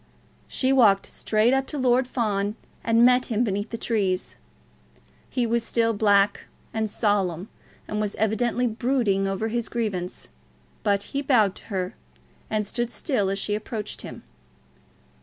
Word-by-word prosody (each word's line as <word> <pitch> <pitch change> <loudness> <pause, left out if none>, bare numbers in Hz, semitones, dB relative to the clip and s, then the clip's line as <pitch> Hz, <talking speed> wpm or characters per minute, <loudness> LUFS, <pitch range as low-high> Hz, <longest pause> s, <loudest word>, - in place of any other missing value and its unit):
She 260 0 +1
walked 210 -7 +5
straight 220 +3 +1
up 270 0 +1
to 300 - -5
Lord 255 -1 +3
Fawn, 210 -4 -1 0.3
and 230 +1 +5
met 250 0 +4
him 230 -1 +1
beneath 205 -1 -2
the 230 - -4
trees. 195 -6 -1 0.9
He 250 -2 0
was 235 0 +1
still 230 0 +1
black 205 -1 +3 0.3
and 220 -1 -1
solemn, 200 -3 0 0.4
and 210 0 -2
was 210 -1 -2
evidently 230 +3 +1
brooding 230 -4 +1
over 195 +3 -1
his 235 0 -2
grievance; 200 -6 -3 0.5
but 200 -1 +1
he 280 - 0
bowed 230 -9 +3
to - - -14
her, 185 -3 -3 0.6
and 215 -1 0
stood 240 +3 -2
still 240 - -1
as 195 - -1
she 205 +1 -1
approached 210 0 -4
him. - - -9
220 Hz, 150 wpm, -25 LUFS, 200-240 Hz, 0.9 s, walked